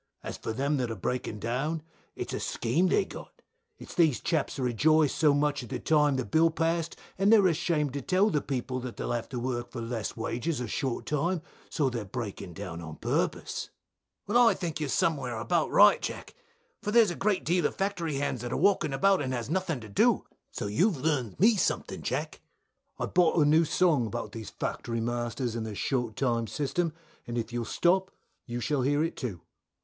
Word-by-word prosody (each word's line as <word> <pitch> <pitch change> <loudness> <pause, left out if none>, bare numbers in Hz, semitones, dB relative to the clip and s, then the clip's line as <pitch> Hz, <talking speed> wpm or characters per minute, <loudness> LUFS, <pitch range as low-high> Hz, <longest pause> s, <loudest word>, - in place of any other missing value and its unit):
As - - -5
for - - -5
them 140 +5 0
that 125 -3 -1
are 115 - -3
breaking 110 +2 -3
down, 135 +9 -2 0.3
it's - - -5
a - - -2
scheme 135 +11 +1
they've 405 - +2
got, - - -11 0.3
it's - - -10
these 160 -7 +3
chaps 160 -4 -1
that 135 - -3
rejoiced 150 +5 +3
so 150 -2 +4
much 145 0 +1
at 120 - -9
the - - -2
time 150 -3 +3
the 130 - -1
bill 165 +1 +4
passed, 165 0 -1 0.2
and 195 +2 +4
they 225 - +9
are 200 - +4
ashamed 155 -4 0
to 140 - -3
tell 195 +6 +2
the 150 - +1
people 130 -1 -3
that 125 -1 -7
they'll - - -3
have 120 -1 -2
to 125 - -4
work 120 -1 -3
for 120 - -6
less 115 -1 -4
wages 120 +6 -2
or 125 - -3
short 130 +2 -2
time, 165 +3 0 0.3
so 150 -4 +1
they 120 -2 -2
are - - -5
breaking 100 -4 -6
down 90 -3 -6
on 80 -2 -8
purpose. - - -2 0.6
Bill. 210 +4 +2
Well, 245 -1 +7
I - - +4
think 165 -4 -4
you're 150 -2 -2
somewhere 135 -6 0
about 160 +9 +1
right, 205 0 +6
Jack, - - -5 0.5
for - - -3
there 230 +2 +7
is 205 - -1
a 195 +2 +1
deal 175 -2 +1
of - - -8
factory 185 -6 -1
hands 135 -3 -1
that 120 0 -5
are - - -1
walking 185 -5 +2
about 195 +7 +3
and 130 -2 -2
has 120 +3 -4
nothing 180 -6 -1
to 110 - -9
do, 100 - +2 0.2
so - - -5
you've 165 - +2
learnt 130 - -1
me 215 +2 +5
something, - - -1
Jack. - - -2
Jack. - - -16 0.6
I - - -1
bought 175 -2 +3
a 150 - +5
new 160 +3 +5
song 150 -8 +2
about 105 - -5
these 110 -2 -7
Factory 115 -1 -3
Masters 120 +1 -2
and 115 -1 -3
their 110 -2 -5
short 120 -1 -1
time 115 -4 0
system, 160 +5 -1 0.4
and 120 0 -3
if 115 0 -3
you'll 120 -1 -2
stop 185 +7 +2 0.4
you 120 0 -3
shall 145 +2 0
hear 145 +4 +2
it 165 - -2
too. 110 - -5
140 Hz, 215 wpm, -29 LUFS, 120-165 Hz, 0.6 s, they